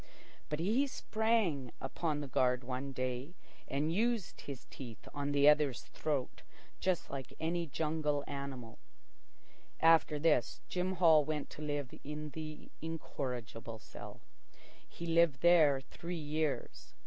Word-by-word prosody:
But 150 - -1
he 225 +11 +2
sprang 215 - +1
upon 150 +2 -2
the 145 - -4
guard 125 0 +2
one 130 +2 -3
day 130 +5 -3 0.3
and 150 +4 0
used 225 0 0
his 140 -3 -7
teeth 120 -5 -9
on 145 0 -1
the 145 0 +5
other's 150 -4 +4
throat 145 -5 -2 0.4
just 185 -2 0
like 135 -2 -6
any 170 +1 0
jungle 150 -1 0
animal. 135 -5 -6 1.0
After 165 -2 +5
this, 150 -5 +2
Jim 185 +1 -1
Hall 165 -4 +6
went 150 0 -3
to - - -9
live 145 -3 -2
in 150 +1 -5
the 155 -1 -7
incorrigible 125 -8 -4
cell. 110 - -10 0.7
He 170 - -7
lived 165 -4 +4
there 160 -6 +6
three 170 +6 -6
years. 155 -2 -2
150 Hz, 130 wpm, -35 LUFS, 135-165 Hz, 1.0 s, Hall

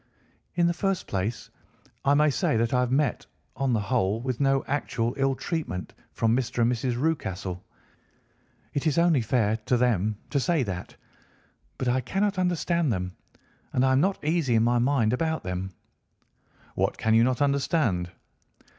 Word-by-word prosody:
"In 175 - +3
the 170 - +2
first 195 +1 -1
place, 100 +4 -3 0.5
I 140 +1 +4
may 150 0 +4
say 115 - +1
that 115 +2 0
I 125 - +3
have 125 -1 0
met, 135 -2 0 0.3
on 135 -1 0
the 110 - +2
whole, 105 -2 0
with 125 0 -3
no 135 -1 +2
actual 125 -4 -1
ill 135 -1 +1
treatment 135 - -4 0.2
from 115 0 +1
Mr. 125 -1 0
and 120 - +3
Mrs. 120 0 -1
Rucastle. 95 - -2 1.1
It 145 +3 -1
is 150 - +1
only 170 -5 +4
fair 110 -1 +1
to 125 - +3
them 110 -4 +1
to 140 - +2
say 160 +1 +1
that. 90 -5 -6 0.8
But 130 - -2
I 130 +1 +2
cannot 195 - -1
understand 170 -4 +1
them, 90 -2 -3 0.6
and 130 - +3
I 130 - +3
am 130 +1 +4
not 195 +3 +1
easy 155 -6 +1
in 110 - +4
my 120 +1 +3
mind 120 -3 +2
about 160 +4 -1
them." 90 +1 -3 1.0
"What - - 0
can 110 - +1
you 115 +1 +6
not 125 0 +1
understand?" 140 - +1
125 Hz, 170 wpm, -26 LUFS, 115-150 Hz, 1.1 s, you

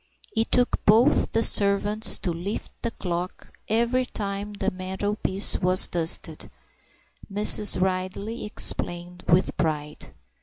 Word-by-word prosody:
It 225 0 -2
took 245 0 0
both 225 +5 +2
the 225 - 0
servants 205 +1 +4
to 180 - -4
lift 175 +6 -6
the 235 - -2
clock 180 -4 -7 0.2
every 235 +3 0
time 205 -3 -6
the 200 - -3
mantelpiece 190 +1 -2
was 185 +1 +5
dusted, 170 -1 0 0.8
Mrs. 205 -1 +5
Ridley 190 +4 -4
explained 175 -3 -2
with 180 +2 +1
pride. 150 -2 -4
200 Hz, 115 wpm, -23 LUFS, 180-215 Hz, 0.8 s, was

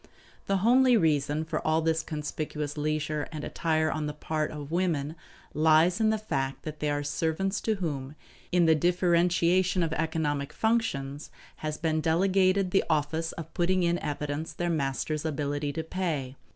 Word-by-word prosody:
The 195 - +2
homely 250 0 +6
reason 150 -3 +1
for 160 - -2
all 155 +1 +1
this 160 0 +1
conspicuous 150 -1 -4
leisure 150 0 -1
and 155 -2 -6
attire 155 -1 0
on 155 -1 -2
the 150 - -5
part 155 0 -2
of 150 -1 -7
women 165 -4 0 0.4
lies 160 +5 +4
in 220 - +4
the 220 - +2
fact 135 -11 -3
that 155 -1 -6
they 150 - 0
are 145 0 -1
servants 165 +7 -1
to 220 - 0
whom, 145 -7 -4 0.4
in 175 -1 +4
the 160 - +6
differentiation 175 +2 +2
of 160 -1 -1
economic 155 -3 -1
functions, 150 -12 -1 0.3
has 155 0 -4
been 160 -2 0
delegated 185 +3 +2
the 195 - +3
office 160 +1 0
of 165 - -8
putting 180 +1 +1
in 170 0 +1
evidence 150 +2 -3
their 175 +2 -1
master's 150 0 -1
ability 145 -1 -2
to 160 - -3
pay. 160 -7 -3
160 Hz, 165 wpm, -28 LUFS, 150-175 Hz, 0.4 s, homely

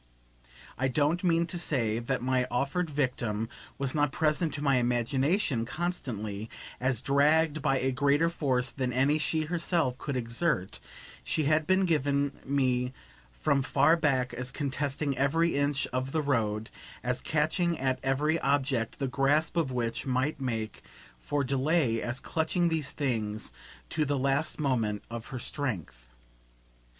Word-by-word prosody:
I 135 - +2
don't 150 +7 +1
mean 170 -1 +3
to 175 0 -5
say 115 -9 0
that 120 0 -2
my 130 0 +1
offered 140 +7 0
victim 120 -6 -1 0.3
was 135 -1 -1
not 145 -2 +2
present 155 +2 +1
to 145 - -4
my 140 -3 +4
imagination, 125 - +1
constantly, 115 - -4 0.3
as 130 -1 0
dragged 150 +3 +3
by 135 -3 +2
a 130 +1 +1
greater 140 +4 +3
force 135 -6 0
than 130 -2 -2
any 135 +5 +2
she 155 +1 0
herself 165 -5 0
could 140 -3 -3
exert; 115 - -1 0.4
she 155 - 0
had 155 +1 +2
been 190 +1 +4
given 145 -4 +1
me 130 -2 +1 0.4
from - - +1
far 145 +4 +4
back 135 -6 +1
as 125 0 -3
contesting 140 +1 -2
every 165 +5 +2
inch 145 -1 +1
of 130 +1 -2
the 160 -1 +1
road, 110 -6 0 0.3
as 125 0 -1
catching 160 +3 +1
at 130 -1 0
every 150 +5 +1
object 135 -4 0
the 135 - -1
grasp 140 +5 +2
of 160 -6 +1
which 120 0 -2
might 130 +3 0
make 115 -4 -3 0.4
for 140 - -1
delay, 135 -2 +1
as 120 +2 -2
clutching 170 +2 0
these 160 -4 0
things 110 - -2 0.4
to 155 - +1
the 145 -1 0
last 140 +4 0
moment 115 -8 0
of 115 -1 -6
her 130 - -6
strength. 90 - -4
135 Hz, 150 wpm, -29 LUFS, 125-155 Hz, 0.4 s, my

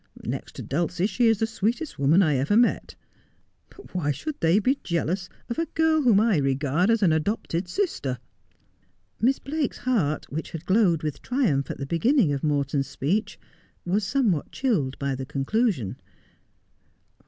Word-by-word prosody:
Next - - -5
to - - -6
Duicie 175 +5 -1
she 240 +1 +2
is 225 -1 +4
the 225 - +1
sweetest 230 - -2
woman 155 +8 +5
I 155 -4 +2
ever 145 +11 +2
met. 240 0 +2 0.7
But 395 - -16
why 170 -5 -1
should 150 - -3
they 165 +3 +3
be 255 +6 +1
jealous 175 +2 -1 0.2
of 235 - -3
a 330 - 0
girl 320 0 +2
whom 235 -7 +5
I 220 -4 +3
regard 140 - +1
as 230 -2 +3
an 175 - +5
adopted 170 +1 -1
sister? 175 - -2 0.5
' 95 +1 -38
Miss 260 +4 +3
Blake's 295 0 -3
heart, 200 - 0
which 155 +3 -5
had 165 0 -6
glowed 185 -5 +3
with 150 -2 -3
triumph 220 - 0
at - - -4
the 140 - -4
beginning 180 - +2
of 140 - -3
Morton's 140 -2 0
speech, 175 - -2 0.5
was 195 +4 +1
somewhat 205 - 0
chilled 185 - 0
by 140 -1 -2
the 130 0 -4
conclusion. 150 - -1
180 Hz, 165 wpm, -25 LUFS, 145-230 Hz, 0.7 s, woman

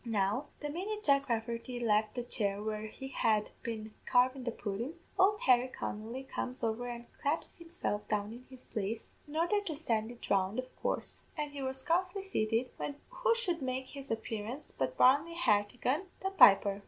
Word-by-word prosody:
Now 220 +3 0
the 295 - -2
minute 415 +6 -3
Jack 280 -1 +4
Rafferty 235 +2 -2
left 215 -1 +2
the 245 - -2
chair 200 -4 -1
where 215 0 -2
he 265 +5 -8
had 215 -5 +2
been 220 -2 -5
carvin' 255 +1 +3
the 235 - 0
pudden, 230 +8 -4 0.2
ould 410 +2 +5
Harry 250 -1 +5
Connolly 230 +1 -5
comes 255 -1 -4
over 230 +2 0
and 240 0 -6 0.2
claps 295 +3 -1
himself 330 -11 -3
down 210 0 -1
in 245 +2 -11
his 260 -1 -13
place, 215 +2 -3 0.2
in 295 - -9
ordher 350 +6 +2
to 315 - -2
send 225 -7 0
it 240 - -10
round, 195 +2 +2
of 255 0 -4
coorse; - - -2 0.2
an' 300 -1 -2
he 285 -1 -6
was 265 0 -3
scarcely 365 +5 +1
sated, 230 - 0
when 285 - -3
who - - +2
should 360 -9 0
make 260 0 -2
his 275 -1 -8
appearance 225 +4 -4
but - - -1
Barney 290 +6 +5
Hartigan, 250 - +2 0.2
the 385 - 0
piper. 200 - +7
250 Hz, 180 wpm, -33 LUFS, 220-295 Hz, 0.2 s, piper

